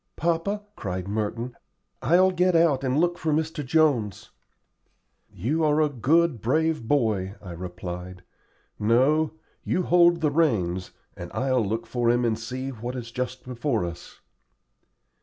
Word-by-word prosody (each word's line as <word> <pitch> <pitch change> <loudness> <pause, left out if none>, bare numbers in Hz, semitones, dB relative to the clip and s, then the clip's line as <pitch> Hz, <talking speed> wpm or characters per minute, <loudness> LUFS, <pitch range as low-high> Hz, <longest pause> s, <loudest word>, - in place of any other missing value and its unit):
"Papa," 170 +5 -1
cried 95 -1 -4
Merton, 110 +4 -3 0.5
"I'll 180 +7 +4
get 180 0 +2
out 165 -5 +3
and 130 +1 0
look 175 +2 +1
for 155 - -1
Mr. 155 0 -1
Jones." 130 -9 +1 1.0
"You 150 - -1
are 150 0 +3
a 155 -1 +3
good, 145 - +2
brave 155 0 0
boy," 110 -8 +1
I 90 - -9
replied. 90 +1 -7 0.6
"No; 135 +9 +3 0.3
you 185 - 0
hold 175 -1 +4
the 150 -2 +2
reins, 95 - +1 0.3
and - - -7
I'll 130 -3 +1
look 110 +3 -2
for 120 -1 0
him 120 +1 +2
and 110 -1 0
see 130 +3 -5
what 120 0 -6
is 120 -2 -6
just 125 +1 -4
before 120 -4 -1
us." 85 0 -9
130 Hz, 140 wpm, -25 LUFS, 110-160 Hz, 1.0 s, I'll